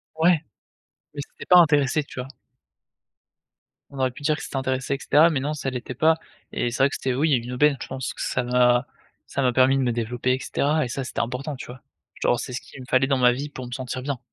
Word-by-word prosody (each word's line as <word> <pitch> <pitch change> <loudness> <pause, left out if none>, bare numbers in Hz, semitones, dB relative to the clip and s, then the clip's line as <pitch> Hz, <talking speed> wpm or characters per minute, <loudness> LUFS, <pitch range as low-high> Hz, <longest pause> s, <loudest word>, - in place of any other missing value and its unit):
Ouais, 165 +1 +4 0.8
mais 145 - -5
c'était - - -12
pas 180 - +7
intéressé, 150 -3 +4
tu 130 - -8
vois? 125 - -7 1.6
On 140 - -9
aurait 130 -1 +1
pu 125 - -13
dire 155 +1 +2
que - - -8
c'était - - -5
intéressé, 130 +1 -1
et - - -5
cetera, 150 +4 +5
mais 150 -5 0
non, 145 +3 -2
ça 145 -3 -3
l'était 125 -1 -5
pas 160 +5 +3 0.3
et 120 - -1
c'est 120 - +1
vrai 140 - +5
que - - -5
c'était, 130 - -2
oui, 150 +5 +1
une 125 0 -1
aubaine. 145 +2 +3
Je - - -5
pense 130 -1 -4
que - - -8
ça 125 - -1
m'a 125 0 +3 0.4
ça - - -2
m'a 125 -2 +3
permis 130 +2 +4
de - - +1
me 125 - +1
développer, 120 +2 -1
et 130 - -1
cetera 150 +3 0
et - - -4
ça, 135 +2 -3
c'était - - -5
important, 130 +5 -4
tu - - -9
vois? 125 0 -11 0.4
Genre, 120 - +2
c'est 125 - -6
ce 125 - -4
qu'il - - -14
me - - -9
fallait 130 +1 +3
dans 135 -1 +2
ma 125 -1 +5
vie 140 +4 -4
pour 130 -3 -8
me 120 - -10
sentir 130 0 -4
bien. 135 -1 -3
130 Hz, 255 wpm, -24 LUFS, 125-145 Hz, 1.6 s, pas